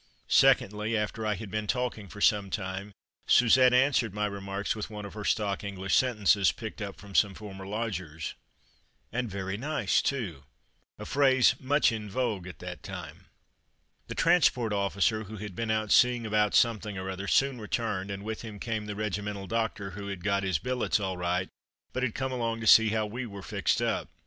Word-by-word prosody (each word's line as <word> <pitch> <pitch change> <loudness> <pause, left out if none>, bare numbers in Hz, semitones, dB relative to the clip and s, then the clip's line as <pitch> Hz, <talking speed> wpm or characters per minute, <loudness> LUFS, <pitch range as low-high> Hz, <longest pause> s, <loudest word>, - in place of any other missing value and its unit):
Secondly, 105 +3 +3
after 105 +1 -2
I 105 - +1
had 105 0 -8
been 110 -1 -2
talking 120 -3 -2
for 100 +2 -10
some 100 -2 +3
time, 100 0 -4 0.4
Suzette 125 +1 +6
answered 125 -5 +3
my 105 0 0
remarks 100 0 -3
with 105 -1 -5
one 105 -1 -7
of 100 - -9
her 105 0 -6
stock 105 -2 0
English 100 -1 -1
sentences, 105 -6 +3
picked 110 -1 -8
up 100 -1 -5
from 100 -1 -12
some 100 0 +3
former 95 -2 -9
lodgers, 95 -7 -4 0.8
"And 125 0 -2
very 95 0 -4
nice 130 -5 +1
too," 95 - -3 0.5
a - - -8
phrase 130 -2 +4
much 140 +1 +3
in 110 -2 -5
vogue 105 -5 -2
at 90 - -9
that - - -8
time. - - -9 0.8
The - - -6
transport 140 -10 +3
officer, 100 +2 +1
who 110 +2 -8
had 105 -2 -7
been 115 +2 -3
out 110 -1 0
seeing 125 -1 +4
about 105 -1 +2
something 110 -3 +2
or 95 0 -4
other, 95 +1 -4
soon 135 -1 +2
returned, 105 -3 -2
and 100 0 -5
with 110 +1 -4
him 110 -3 -8
came 110 0 -3
the 105 - -4
regimental 105 -1 -3
doctor, 110 -2 -2
who 100 +1 -7
had 100 -3 -6
got 100 0 +1
his 95 -4 0
billets 125 +4 0
all 95 -2 -2
right, 90 +1 -1 0.5
but 130 - -2
had 125 -4 -1
come 130 0 -2
along 115 -2 -2
to - - -4
see 110 0 +7
how 110 0 0
we 120 +4 -5
were 100 -2 -9
fixed - - 0
up. - - -1
105 Hz, 190 wpm, -29 LUFS, 100-115 Hz, 0.8 s, see